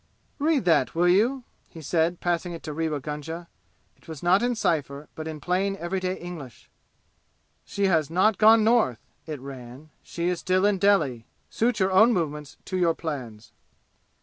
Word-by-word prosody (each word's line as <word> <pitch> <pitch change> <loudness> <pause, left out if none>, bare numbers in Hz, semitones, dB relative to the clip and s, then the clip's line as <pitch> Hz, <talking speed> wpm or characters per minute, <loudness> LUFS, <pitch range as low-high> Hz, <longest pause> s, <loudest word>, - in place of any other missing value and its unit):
"Read 295 - +1
that, 165 -6 +2
will 175 +2 +3
you?" 230 +9 +2 0.3
he 165 - -12
said, 165 +3 0
passing 175 0 -1
it 165 - -9
to 155 - -5
Rewa 155 -1 -2
Gunga. 155 +4 -6 0.5
It - - -26
was 160 -2 -9
not 180 +3 +4
in 245 0 0
cypher, 145 -7 -2
but 160 0 -7
in 155 -1 -6
plain 190 +4 0
everyday 185 +1 -2
English. 165 -9 -10 0.9
"She 200 - -1
has 160 -6 +2
not 190 +5 +2
gone 220 0 +6
North," 220 - +2 0.2
it 155 -3 -5
ran. 135 +2 -10
"She 170 0 -4
is 180 -1 -1
still 185 +2 +1
in 205 -2 +2
Delhi. 150 - +2 0.2
Suit 230 0 0
your 190 0 +2
own 220 +6 +6
movements 150 -5 -3
to 185 - -3
your 170 -2 +2
plans." 120 -9 -6
170 Hz, 170 wpm, -25 LUFS, 150-195 Hz, 0.9 s, gone